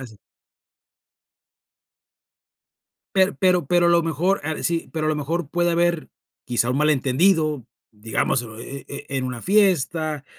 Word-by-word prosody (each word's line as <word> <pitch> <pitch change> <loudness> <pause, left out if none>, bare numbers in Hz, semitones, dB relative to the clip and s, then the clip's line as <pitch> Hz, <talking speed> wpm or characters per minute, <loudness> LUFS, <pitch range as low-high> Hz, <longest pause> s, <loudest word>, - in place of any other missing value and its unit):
así. 115 -5 -11 3.0
Per 190 +1 +3
pero 180 -5 +2
pero 175 +2 +3
lo 170 0 +4
mejor 170 +4 0
ah 155 +1 -3
sí. 170 -1 -1
Pero 155 -1 -2
a - - +1
lo 155 - 0
mejor, 150 +1 -3
puede 175 +1 0
haber 170 -1 0 0.4
quizá 120 0 0
un 130 - -1
malentendido, 150 - +2 0.3
digamos, 110 +3 -1 0.2
eh 140 +3 -8
eh, 140 +1 -8
en 135 -1 -2
una 125 -2 -5
fiesta, 165 -6 +1
155 Hz, 135 wpm, -22 LUFS, 135-175 Hz, 3.0 s, lo